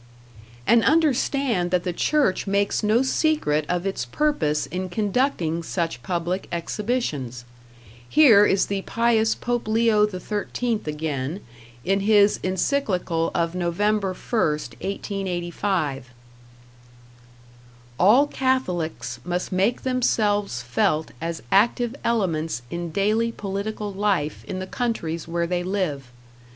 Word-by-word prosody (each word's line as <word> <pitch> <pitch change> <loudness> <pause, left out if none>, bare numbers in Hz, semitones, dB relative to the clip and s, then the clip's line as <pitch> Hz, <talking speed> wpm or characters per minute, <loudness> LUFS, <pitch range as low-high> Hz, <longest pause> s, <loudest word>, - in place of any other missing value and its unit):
And 235 0 +5
understand 275 - +2
that 180 -1 +1
the 180 - -2
church 270 - +1
makes 200 +1 +1
no 220 +4 +3
secret 260 - +1
of 180 +1 -1
its 195 -10 -2
purpose 150 - 0
in 185 +2 -4
conducting 200 - 0
such 165 -6 -3
public 175 +4 -2
exhibitions. 170 - -3 0.6
Here 240 -10 +7
is 195 -2 +3
the 200 -1 -2
pious 225 0 +2
Pope 240 -2 -2
Leo 220 -1 +3
XIII 210 +4 -2
again, 150 +2 -3 0.4
in 195 +2 +2
his 205 0 +4
Encyclical 185 -4 0
of 170 0 0
Nov. 175 -1 -2
1, 210 +1 +4
1885: 180 - -2 1.9
All 225 +10 +6
Catholics 180 - -1
must 180 0 -3
make 195 +6 +1
themselves 210 - 0
felt 150 +6 0
as 165 -4 -4
active 235 +4 +3
elements 165 - -1
in 170 0 -4
daily 215 +6 +1
political 205 0 -4
life 190 -7 -1
in 185 - -5
the 185 - -4
countries 180 -9 -3
where 170 0 -1
they 175 +1 -1
live. 180 -7 -2
195 Hz, 115 wpm, -24 LUFS, 170-225 Hz, 1.9 s, Here